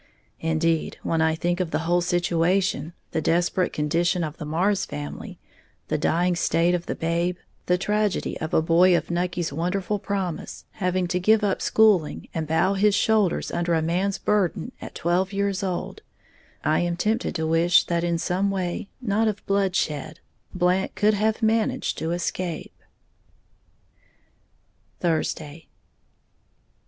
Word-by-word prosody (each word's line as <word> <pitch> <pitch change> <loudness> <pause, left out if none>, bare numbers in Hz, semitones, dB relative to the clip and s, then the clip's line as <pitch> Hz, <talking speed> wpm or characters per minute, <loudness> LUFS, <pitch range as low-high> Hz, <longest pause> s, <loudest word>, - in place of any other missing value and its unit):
Indeed, 160 0 0
when 165 -1 0
I 160 0 +2
think 175 +2 -1
of 180 -3 -1
the 160 - -2
whole 175 +1 +2
situation, 175 -1 +1 0.2
the 160 - -1
desperate 175 +3 +1
condition 170 +4 0
of 155 0 -5
the 155 - -6
Marrs 185 +6 +1
family, 75 0 -7 0.5
the - - +1
dying 175 +2 +1
state 170 +1 +2
of 175 -1 -2
the - - -2
babe, 170 +2 -1 0.3
the 180 - +3
tragedy 210 +1 0
of 160 - -4
a 160 - +3
boy 175 +2 +5
of 165 +1 -4
Nucky's 175 -2 -1
wonderful 185 +6 -1
promise 195 -5 -4
having 185 -1 -1
to 180 - 0
give 215 +4 +3
up 200 -2 0
schooling 210 -8 +2
and 160 -1 -3
bow 160 +5 +2
his 200 +1 +3
shoulders 215 -4 +2
under 170 0 0
a 160 - +1
man's 185 +4 0
burden 205 -5 0
at - - -9
twelve 180 +3 0
years 200 -1 0
old, 185 -3 -3 0.6
I 155 - +2
am 175 0 -1
tempted 220 +6 0
to 160 - -1
wish 165 +2 +4
that 170 -1 -1
in 170 -1 +1
some 180 +4 0
way, 190 0 -3
not 220 -1 +1
of 210 -2 -3
bloodshed, 170 -6 -1 0.3
Blant 180 +1 +1
could 210 +1 +3
have 220 +2 0
managed 220 0 +1
to 160 - -2
escape. 175 -1 -3 2.3
_Thursday. 160 -2 -2
175 Hz, 145 wpm, -24 LUFS, 165-195 Hz, 2.3 s, boy